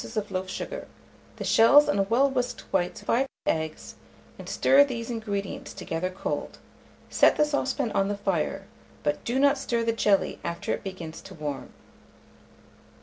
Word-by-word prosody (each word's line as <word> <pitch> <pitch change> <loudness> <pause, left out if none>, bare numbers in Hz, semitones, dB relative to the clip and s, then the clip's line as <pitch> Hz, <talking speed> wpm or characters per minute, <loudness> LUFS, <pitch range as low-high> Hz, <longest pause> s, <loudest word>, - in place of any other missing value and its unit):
of 210 -1 -2
loaf 185 0 -3
sugar, - - -5 0.5
the - - -6
shells 280 +6 +6
and 195 0 +1
well 255 +5 +4
whisked 250 -2 -2
whites 180 -2 0
of - - -17
5 265 +3 +2 0.2
eggs, 160 -1 -2 0.5
and - - -8
stir 280 +1 +5
these 240 -4 -4
ingredients 205 -4 -4
together 180 -1 -3
cold; 185 - -4 0.5
set - - +5
the 300 - +4
saucepan 275 -4 -1
on 195 0 +1
the 205 0 -2
fire, 135 - -1 0.4
but 145 0 -1
do 240 +3 -1
not 280 0 +4
stir 235 -4 -1
the 230 0 +1
jelly 205 -3 +2
after 170 0 -2
it - - -5
begins 175 -5 -7
to 190 - -12
warm. 150 -3 -5
205 Hz, 160 wpm, -27 LUFS, 185-255 Hz, 0.5 s, shells